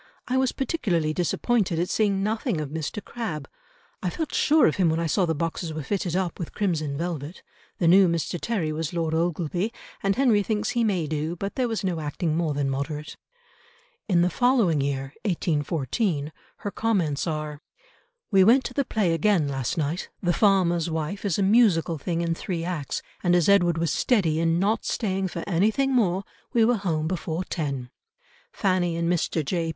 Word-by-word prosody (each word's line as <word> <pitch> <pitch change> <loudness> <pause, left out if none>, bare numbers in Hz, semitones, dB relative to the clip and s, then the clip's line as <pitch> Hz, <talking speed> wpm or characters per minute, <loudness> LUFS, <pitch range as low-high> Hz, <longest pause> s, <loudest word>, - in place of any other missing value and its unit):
I 250 - 0
was 260 -1 +2
particularly 190 - -1
disappointed 180 +2 0
at 175 +2 0
seeing 200 -2 +1
nothing 220 - -1
of 150 -2 -4
Mr. 160 +6 -4
Crabbe. 160 - -5 0.5
I 180 - 0
felt 315 - -4
sure 310 0 +4
of 155 - +2
him 180 -4 +3
when 160 +1 0
I 170 - 0
saw 175 +3 +1
the 160 - 0
boxes 165 +1 -3
were 155 - -4
fitted 180 +1 -2
up 185 -3 -1
with 170 - -6
crimson 155 -8 -1
velvet. 165 -1 -4 0.3
The 170 - +1
new 190 +2 +7
Mr. 170 0 -2
Terry 190 -10 -1
was 155 +1 -3
Lord 165 -2 -1
Ogleby, 175 +4 -1 0.3
and 195 0 +1
Henry 240 -6 +4
thinks 210 0 -1
he 235 - +1
may 190 -7 +1
do, 155 +2 -2
but 195 +3 -4
there 255 -2 0
was 225 -3 -2
no 180 -4 -1
acting 155 +2 -2
more 160 -3 0
than 140 -1 0
moderate." 145 +3 -4 0.9
In 175 -3 +4
the 180 - +1
following 225 - +3
year, 135 0 -2
1814, 160 - -1 0.3
her 205 - -1
comments 180 -11 0
are, 150 -2 -4 0.7
"We 195 -2 +6
went 245 +6 +5
to - - -5
the 280 - +1
play 210 -9 0
again 165 -2 +2
last 135 +3 -2
night. 160 +3 -2
The 175 -2 +1
Farmer's 175 -5 +3
Wife 160 +6 -3
is 195 -5 +1
a 200 - +2
musical 190 -7 +3
thing 170 +3 -2
in 170 -1 0
three 165 0 -4
acts, 170 -6 -3 0.2
and, 175 -1 +3
as 175 -3 +3
Edward 175 -4 +4
was 165 0 0
steady 175 -11 +2
in 165 0 +2
not 205 +5 +1
staying 195 -4 -1
for 170 -2 -5
anything 215 +9 +2
more, 195 -6 +2 0.3
we 230 -2 +5
were 240 0 +3
home 160 -6 -1
before 170 0 -2
ten. 140 -8 -4 0.6
Fanny 185 -3 +1
and 170 0 -1
Mr. 170 -2 0
J. 165 +1 -1
175 Hz, 190 wpm, -25 LUFS, 160-200 Hz, 0.9 s, new